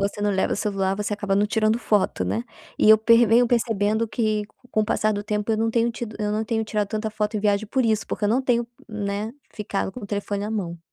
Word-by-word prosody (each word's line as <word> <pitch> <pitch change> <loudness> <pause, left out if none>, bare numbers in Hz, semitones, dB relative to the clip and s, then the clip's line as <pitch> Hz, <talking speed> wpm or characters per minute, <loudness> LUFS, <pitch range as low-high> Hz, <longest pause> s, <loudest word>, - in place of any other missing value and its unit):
você 200 +1 -1
não 205 - +2
leva 190 -1 +1
o - - -5
celular 195 -2 0
você 210 0 -3
acaba 205 -1 -1
não 205 - +3
tirando 220 +1 +1
foto, 205 - +1
né, 100 +5 -1 0.4
e - - +4
eu 220 - +10
per 230 +2 +5
venho 235 +3 +5
percebendo 225 -2 +1
que 215 -2 0 0.3
com 215 - +1
o - - +2
passar 215 0 +1
do 205 - -3
tempo 210 +1 -1
eu - - +1
não 225 +1 +1
tenho 235 +1 +2
tido 230 -2 -6
eu 210 -1 -1
não 215 +1 0
tenho 220 0 -1
tirado 210 -2 -1
tanta 215 +1 -3
foto 210 0 -2
em - - -2
viagem 205 0 +1
por 260 +2 +1
isso, 220 -2 +1
porque 210 - -3
eu - - +3
não 245 +4 +3
tenho 240 -2 +1 0.2
né, 210 0 -3 0.2
ficado 200 -2 -3
com 250 - -8
o 205 - -7
telefone 205 0 -3
à 210 - -4
mão. 180 -6 -3
215 Hz, 260 wpm, -24 LUFS, 205-225 Hz, 0.4 s, eu